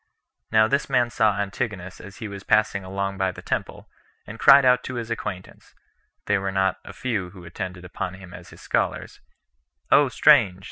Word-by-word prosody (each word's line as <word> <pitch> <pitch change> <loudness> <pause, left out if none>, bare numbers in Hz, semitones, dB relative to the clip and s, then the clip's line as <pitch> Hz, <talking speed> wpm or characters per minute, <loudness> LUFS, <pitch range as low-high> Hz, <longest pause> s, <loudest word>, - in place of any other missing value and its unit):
Now 110 0 +5
this 140 +4 -1
man 125 -3 +2
saw 110 -5 +2
Antigonus 100 -3 -4
as 100 - -12
he 115 - -6
was 100 -1 -8
passing 110 -2 +1
along 100 +1 -4
by 95 -1 +1
the - - -12
temple, - - -4 0.4
and 110 +2 -10
cried 140 -1 +7
out 125 0 +4
to 130 - -5
his 115 -1 -5
acquaintance, 95 -5 -7 0.5
[they 105 -1 +1
were 95 0 -3
not 95 -1 0
a - - -10
few 105 -8 -3
who 90 -1 -13
attended 90 +1 -7
upon 90 +1 -5
him 95 -2 -13
as 90 -1 -12
his - - -15
scholars,] - - -2 0.7
"O 145 -2 +5
strange!" 125 -10 +4
100 Hz, 185 wpm, -24 LUFS, 95-120 Hz, 0.7 s, cried